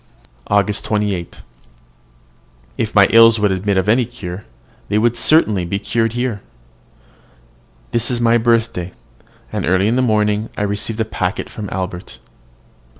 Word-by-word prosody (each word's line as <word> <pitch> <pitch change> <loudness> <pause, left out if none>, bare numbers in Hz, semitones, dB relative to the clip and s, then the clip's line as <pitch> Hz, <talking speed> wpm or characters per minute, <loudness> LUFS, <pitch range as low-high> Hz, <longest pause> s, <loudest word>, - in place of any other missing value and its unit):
AUGUST 100 0 +1
28. 105 -5 -2 1.3
If 110 0 -3
my 100 -1 +7
ills 115 0 +6
would 105 -1 +2
admit 95 +1 -1
of 95 +1 0
any 120 +4 +3
cure, 100 -5 -8 0.4
they 105 - +1
would 120 +2 +2
certainly 115 - +2
be 85 +3 -2
cured 115 +2 -1
here. 120 -4 -2 1.5
This 120 0 -1
is 125 -2 -1
my 120 0 +3
birthday, 115 -6 0 0.6
and - - -2
early 95 +2 +2
in 115 +3 +1
the - - +3
morning 105 -2 +1
I - - -1
received 105 +2 -2
a - - 0
packet 95 -3 -3
from 105 -3 -7
Albert. 90 -1 -5
105 Hz, 145 wpm, -18 LUFS, 100-115 Hz, 1.5 s, my